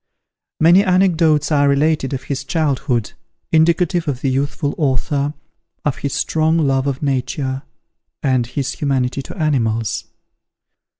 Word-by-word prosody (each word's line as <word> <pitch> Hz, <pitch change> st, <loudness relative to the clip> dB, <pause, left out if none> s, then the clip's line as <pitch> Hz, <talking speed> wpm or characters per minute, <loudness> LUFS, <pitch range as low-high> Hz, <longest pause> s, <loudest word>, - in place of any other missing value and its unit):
Many 175 Hz, +5 st, +6 dB
anecdotes 170 Hz, -6 st, +2 dB
are 145 Hz, -1 st, +3 dB
related 145 Hz, 0 st, +1 dB
of 135 Hz, -1 st, -4 dB
his 135 Hz, 0 st, -4 dB
childhood, 135 Hz, -7 st, -1 dB, 0.4 s
indicative 170 Hz, +1 st, +2 dB
of 135 Hz, -3 st, -2 dB
the 135 Hz, -, 0 dB
youthful 140 Hz, +2 st, -1 dB
author, 140 Hz, +1 st, 0 dB, 0.5 s
of 150 Hz, -, 0 dB
his 140 Hz, -, -3 dB
strong 160 Hz, +1 st, +1 dB
love 135 Hz, -3 st, +1 dB
of 140 Hz, +1 st, -3 dB
Nature, 135 Hz, 0 st, -1 dB, 0.6 s
and 130 Hz, -4 st, +1 dB
his 135 Hz, +1 st, -3 dB
humanity 135 Hz, -2 st, -1 dB
to 135 Hz, -, -10 dB
animals. 115 Hz, -, 0 dB
140 Hz, 125 wpm, -19 LUFS, 130-155 Hz, 0.6 s, Many